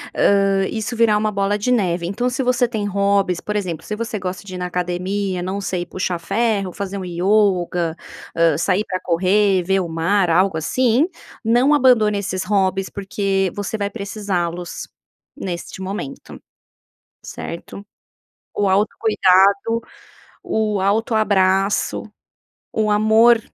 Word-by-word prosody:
hã, 195 -1 +3
isso 225 +2 -3
virar 225 -2 +3
uma 215 0 0
bola 200 0 0
de 210 +5 -1
neve. 180 -7 +1
Então, 215 +8 -1
se 260 +2 -2
você 250 0 +2
tem 220 -3 -3
hobbies, 200 -2 +1
por 210 - -5
exemplo, 175 -6 -3
se 210 - -4
você 225 -1 -4
gosta 185 0 -5
de 185 -2 -8
ir - - -5
na 180 - -3
academia, 180 +2 -2
não 190 +3 -3
sei, 180 -2 -2
puxar 180 0 -3
ferro, 205 -1 -1
fazer 200 0 -5
um 190 - -5
yoga, 180 -2 +1 0.4
hã, 165 -3 +3
sair 185 +4 +1
para 185 -1 -3
correr, 190 +2 +2
ver 190 +2 +1
o 180 - -2
mar, 170 +4 +1
algo 180 +1 +2
assim, 250 - +2 0.4
não 245 +6 +4
abandone 245 -7 +4
esses 190 -2 -3
hobbies 195 -1 0
porque 195 -1 -1
você 205 +2 -3
vai 200 -1 -2
precisá-los 195 -5 -4 0.5
neste 185 -6 -6
momento, 190 -8 -7 0.8
certo? 185 +4 -8 0.7
O 205 - 0
autocuidado, 200 +1 +3 0.6
o 215 -2 -1
autoabraço, 200 -2 +1 0.7
o 215 -1 0
amor, 220 +2 +5
200 Hz, 140 wpm, -20 LUFS, 185-215 Hz, 0.8 s, amor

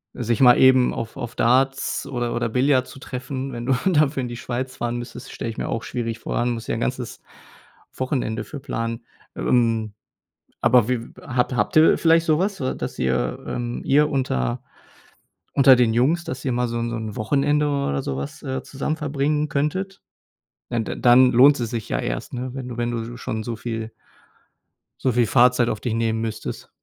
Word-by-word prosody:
sich 120 -1 -1
mal 125 -2 +7
eben 130 -1 +5
auf 115 +3 -6
auf 120 -3 -5
Darts 130 +3 +1
oder 120 -2 -3
oder 120 0 0
Billard 130 +2 +2
zu 135 - -12
treffen, 130 +1 -5
wenn 120 -1 -6
du 135 - +2
dafür 150 -5 +2
in 125 - -3
die 120 0 -6
Schweiz 130 +2 -4
fahren 120 -1 -2
müsstest, 120 +2 -8
stelle 115 - -5
ich 110 - -7
mir - - -3
auch 115 - -2
schwierig 115 -2 -4
vor - - -4
allem 120 +1 +1
musst 115 -1 -7
ja - - -1
'n 115 - -3
ganzes 125 -1 -3 0.8
Wochenende 125 -5 -2
für 145 - -8
planen. 115 -3 -4 0.3
Ähm, 115 -3 +1 0.7
aber 120 -1 +4
wie 125 -2 +1 0.2
habt 125 0 -1
habt 105 - 0
ihr 155 +1 +6
vielleicht 165 0 +4
so 155 -1 +2
was, 195 -3 -1
wa 130 - -1
dass - - -6
ihr 65 -1 0
ähm, 120 0 -3
ihr 150 +2 +3
unter 65 - -1 0.9
unter 135 -1 +7
den 120 -3 +3
Jungs, 150 +9 +2
dass 130 -4 -6
ihr 130 - +1
mal 125 0 0
so 115 0 -3
'n 115 - -2
so 120 - -3
'n 110 -2 -5
Wochenende 145 +6 +1
oder 140 - -1
so 65 -1 -4
was, 70 +1 -6
äh, 130 -1 -3
zusammen 145 +3 -3
verbringen 150 0 0
könntet? 185 +8 -2 0.7
Da 120 - -2
da 110 - -3
dann 125 +1 +6
lohnt 140 +4 +6
es 115 -2 -3
sich 115 -3 -4
ja - - 0
erst, - - -4
ne, 125 0 -4
wenn 130 -2 -6
du 120 - -7
wenn 120 0 -1
du 120 0 -5
sch - - -14
schon 110 - -3
so 115 0 -4
viel 115 0 -5 1.1
so 130 - +1
viel 120 -1 +2
Fahrzeit 125 -2 +4
auf 110 - -2
dich 120 -3 -2
nehmen 115 -1 0
müsstest. 110 -1 -5
125 Hz, 200 wpm, -23 LUFS, 115-135 Hz, 1.1 s, mal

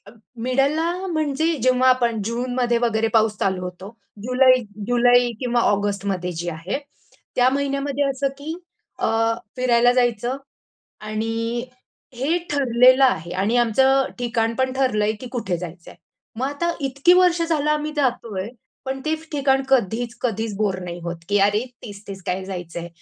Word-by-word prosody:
अ, - - -22 0.2
मिडलला 280 +6 +1 0.2
म्हणजे 315 0 0
जेव्हा 255 0 +4
आपण 235 -4 +2
जूनमध्ये 245 +1 0
वगैरे 225 -2 +1
पाऊस 220 -1 +3
चालू 190 -1 0
होतो. 180 +2 -7 0.3
जुलै 255 +2 +5 0.3
जुलै 245 0 +4
किंवा 245 -2 +1
ऑगस्टमध्ये 200 -3 0
जे 175 +1 -3
आहे, 170 - -4 0.6
त्या 250 0 +4
महिन्यामध्ये 280 +1 -1
असं 275 +1 -1
की 300 +3 -5 0.5
अ, - - +1 0.5
फिरायला 245 -1 +4
जायचं 245 0 +1 0.7
आणि 225 +2 -2 0.5
हे 280 +8 0
ठरलेलं 255 -1 +5
आहे 170 -9 0
आणि 200 +6 +1
आमचं 240 +1 +3 0.2
अ, - - -4
ठिकाण 230 -2 0
पण 260 +1 0
ठरलंय 215 -6 +1
की 255 - -6
कुठे 195 -8 -2
जायचंय. 170 0 -9 0.4
मग 250 +4 -2
आता 315 +5 -1
इतकी 275 +6 +3
वर्ष 360 -2 +4
झालं 305 -3 0
आम्ही 300 0 -1
जातोय, 235 -8 -1 0.4
पण 265 0 -3
ते 315 - +1
फ 315 0 -13
ठिकाण 270 -2 +2
कधीच-कधीच 230 -2 0
बोर 200 -3 0
नाही 175 0 -6
होत 170 0 -4
की 205 0 +3
अरे 205 +4 +2 0.2
तेच-तेच 200 -3 -9
काय 185 +1 -2
जायचंय. 175 -2 -6
240 Hz, 145 wpm, -22 LUFS, 205-270 Hz, 0.7 s, जुलै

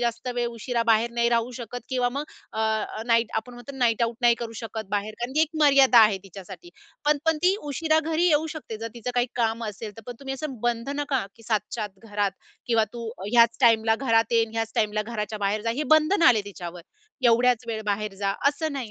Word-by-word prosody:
जास्त 235 +1 -2
वेळ 240 0 0
उशिरा 235 +1 -2
बाहेर 225 +1 +3
नाही 235 0 +2
राहू 235 0 +1
शकत 240 +1 -6
किंवा 250 -2 +1
मग 290 - -3 0.3
अ, 220 - -3 0.5
नाईट 230 -1 +3
आपण 240 +3 -4
म्हणतो 245 +3 -10
ना, 270 - -10
नाईट 235 -2 +2
आउट 230 0 0
नाही 240 -1 +5
करू 230 - -5
शकत 220 -2 -6
बाहेर. 210 +1 -2
कारण 245 +2 -3
ती 310 - +3
एक 320 - 0
मर्यादा 275 -4 +6
आहे 210 -3 +5
तिच्यासाठी 195 - -11 0.3
पण 295 0 +3
पण 320 -1 +3
ती 370 +2 +5 0.2
उशिरा 315 +3 +2
घरी 330 +2 +2
येऊ 310 0 +3
शकते, 230 -7 -7
जर 230 - -4
तिचं 240 +1 -4
काही 245 0 +2
काम 230 -1 0
असेल 210 0 -7
तर. 225 - -11
पण 245 - -5
तुम्ही 270 -1 -4
असं 270 -4 -6
बंधन 240 +5 -1
का? 265 -6 0
की 230 - -17
7:00 220 -2 +1
च्या 220 -3 -3
आत 195 -2 -10
घरात 205 -1 0 0.4
किंवा 230 -2 +3
"तू 235 -1 -6 0.2
ह्याच 235 -1 +5
टाईमला 225 -2 +4
घरात 225 0 +3
ये, 230 -1 +4
ह्याच 225 0 -2
टाईमला 215 0 +1
घराच्या 215 -1 -4
बाहेर 205 +1 -1
जा," 230 - 0
हे - - +1
बंधन 320 +5 +1
आले 225 -4 +4
तिच्यावर, 175 -3 -8 0.5
"एवढ्याच 240 +1 +3
वेळ 220 -2 -3
बाहेर 205 0 -2
जा," 195 0 +1
असं 310 +1 -2
नाही 255 -6 -5
235 Hz, 220 wpm, -25 LUFS, 220-250 Hz, 0.5 s, मर्यादा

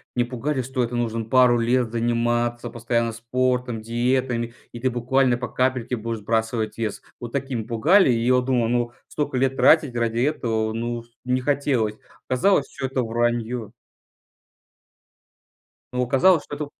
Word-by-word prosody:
Мне 120 -1 +2
пугали, 130 +3 -2
что 130 0 -2
это 120 +1 -3
нужно 115 -1 -2
пару 125 +1 +4
лет 120 +1 +1
заниматься 120 +1 0
постоянно 115 0 -1
спортом, 125 0 -1
диетами, 120 +1 -1 0.2
и 120 - -8
ты 130 +1 0
буквально 125 +1 +2
по 125 0 -4
капельке 125 0 -1
будешь 115 0 -4
сбрасывать 110 +1 -1
вес. 110 -3 -3 0.2
Вот 120 -1 -7
таким 130 -4 -3
пугали. 140 - +4
И 115 -1 0
я 125 +1 +4
вот 125 0 +1
думал: 125 -3 +1
"Ну, 120 0 0 0.2
столько 145 -3 -2
лет 135 +1 +1
тратить 150 -6 +4
ради 115 -1 0
этого, 115 -5 0
ну, 120 +1 -3 0.2
не 125 0 0
хотелось". 130 -6 0 0.3
Оказалось, 140 +3 +2
всё - - -6
это 130 0 -1
враньё. 120 -1 -1 2.2
Но 125 - -1
оказалось, 145 +7 +4
что 145 - -7
это 150 +1 -4
120 Hz, 155 wpm, -23 LUFS, 115-130 Hz, 2.2 s, пару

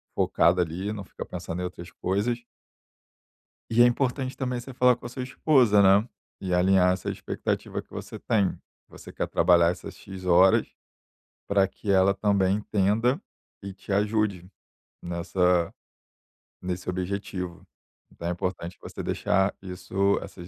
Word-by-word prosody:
focada 90 +2 +3
ali; 90 +5 -3
não 105 -2 -6
fica - - -8
pensando 90 0 -5
em - - -2
outras 90 -1 -8
coisas. 115 +8 -1 1.3
E 115 +1 +4
é 120 - +9
importante 130 +1 0
também 125 -2 -2
você 130 +2 -9
falar 125 0 +4
com - - -15
a 120 - -4
sua 125 +1 -5
esposa, 125 -5 +4
né, 100 +3 +5 0.3
e 95 -2 -2
alinhar 90 0 +4
essa 95 - -4
expectativa - - -3
que - - -28
você - - -7
tem, 105 -5 +1 0.3
você - - -12
quer - - -2
trabalhar 85 0 +4
essas 90 - -8
x 95 -1 -10
horas 90 +2 +5 0.8
pra 100 -1 +3
que 100 +1 -4
ela 95 0 +4
também 100 -1 +2
entenda 105 - +1 0.4
e 100 -1 -7
te 95 +1 -10
ajude 105 -3 0 0.5
nessa 90 0 0 0.9
nesse 90 0 -4
objetivo 90 -1 -4 0.5
então 85 - -7
é - - 0
importante 90 0 -4
você - - -7
deixar 95 0 +1
isso, 95 +1 0
essas 85 - -10
95 Hz, 145 wpm, -26 LUFS, 90-105 Hz, 1.3 s, é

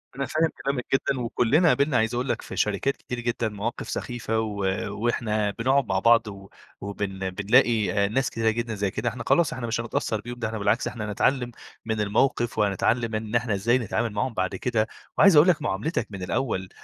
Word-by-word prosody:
أنا 140 +1 -2
فاهم 160 +3 +1
كلامك 135 -3 -1
جدًا 135 0 +1
وكلّنا 125 +8 +2
قابلنا 140 -3 +3
عايز 110 0 +1
أقول 125 +2 -2
لك - - -1
في - - -8
شركات 105 +7 0
كتير 125 - -6
جدًا 120 -1 -1
مواقِف 105 +3 -4
سخيفة 115 -2 -2
و 110 -2 -3 0.3
وإحنا 110 -2 -1
بنقعُد 130 +3 +2
مع 95 -3 0
بعض 115 +2 +4
و 100 -1 -9 0.3
وبن 95 -1 -4
بنلاقي 105 +1 +2
ناس 130 +4 0
كتيرة 115 -1 0
جدًا 115 +1 -2
زي 100 -1 -1
كده، 120 - -1
إحنا 120 +1 -7
خلاص، 170 -4 +3
إحنا 125 -1 -4
مش 115 0 -1
هنتأثّر 110 -2 -2
بيهم 120 +1 -8
ده 115 - -1
إحنا 110 0 -4
بالعكس، 110 +4 +1
إحنا 105 -3 -4
نتعلّم 125 +3 +1 0.3
من 110 -1 -1
الموقِف 120 +3 +1
وهنتعلّم 110 +3 +1
إن 110 +1 -3
إحنا 120 -2 +1
إزاي 115 +5 +2
نتعامل 120 -1 -1
معاهُم 115 +4 -1
بعد 95 -3 -1
كده 115 -3 0 0.3
وعايز 195 -5 +7
أقول 150 +4 +7
لك 170 -4 +3
معاملِتك 150 - -1
من 95 -2 -6
الأول 95 -2 -2
115 Hz, 195 wpm, -25 LUFS, 105-125 Hz, 0.3 s, وعايز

